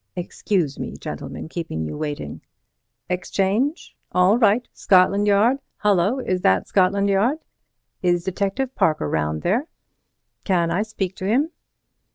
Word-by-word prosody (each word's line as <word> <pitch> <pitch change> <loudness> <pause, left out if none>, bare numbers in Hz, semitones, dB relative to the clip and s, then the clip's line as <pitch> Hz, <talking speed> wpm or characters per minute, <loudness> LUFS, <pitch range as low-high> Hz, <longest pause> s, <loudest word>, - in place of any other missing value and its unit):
Excuse 175 -3 -2
me, - - -5
gentlemen, - - -7
keeping 160 - -4
you 75 - -5
waiting.—Exchange! 180 - -4 0.2
all 180 +3 +4
right—Scotland 205 -3 +3
Yard—Hullo! 210 -1 +2
Is 185 -7 -1
that 95 - +2
Scotland 200 +1 +2
Yard?—Is 195 - -2
Detective 200 +8 -2
Parker 155 - +1
round 75 +1 -1
there?—Can 185 - -3
I 180 +4 +1
speak 195 -3 -3
to 185 - -4
him? 275 +10 +2
195 Hz, 105 wpm, -22 LUFS, 175-215 Hz, 0.2 s, all